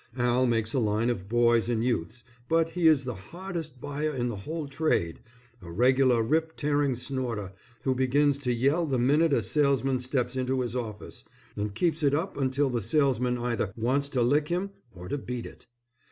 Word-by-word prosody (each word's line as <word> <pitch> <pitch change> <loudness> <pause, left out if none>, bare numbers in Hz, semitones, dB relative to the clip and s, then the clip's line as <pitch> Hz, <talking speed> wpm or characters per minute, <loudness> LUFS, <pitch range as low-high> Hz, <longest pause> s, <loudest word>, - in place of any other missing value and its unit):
Al 125 +1 +2
makes 115 -1 0
a 135 - +2
line 110 +1 +1
of 100 -4 -5
boys' 120 0 +3
and 115 -2 0
youths', 120 -1 -2 0.3
but 165 0 +2
he 175 -2 +2
is 155 -4 +5
the 125 -1 -4
hardest 165 - -7
buyer 145 +2 -3
in 120 -1 -1
the 120 - -4
whole 150 +10 -5
trade, 140 - 0 0.4
a 85 - -10
regular 125 +3 +3
rip 160 +6 0
tearing 145 -2 +1
snorter 120 -6 -4 0.3
who 130 - +2
begins 140 +2 +2
to 130 -3 -1
yell 140 +8 +1
the 135 -3 0
minute 145 +6 +3
a - - +2
salesman 135 -3 +1
steps 125 0 -1
into 130 0 0
his 120 -1 -3
office, 110 -4 -6 0.3
and 105 0 -3
keeps 165 +4 0
it 145 -1 +3
up 170 +6 -2
until 135 0 0
the 120 -1 -1
salesman 125 -1 +1
either 120 -4 -2
wants 135 +5 0
to 125 -4 +1
lick 145 +5 +2
him 180 +4 -2 0.2
or 90 -3 -10
to 145 - -2
beat 125 -2 -5
it. - - -12
130 Hz, 190 wpm, -27 LUFS, 120-145 Hz, 0.4 s, is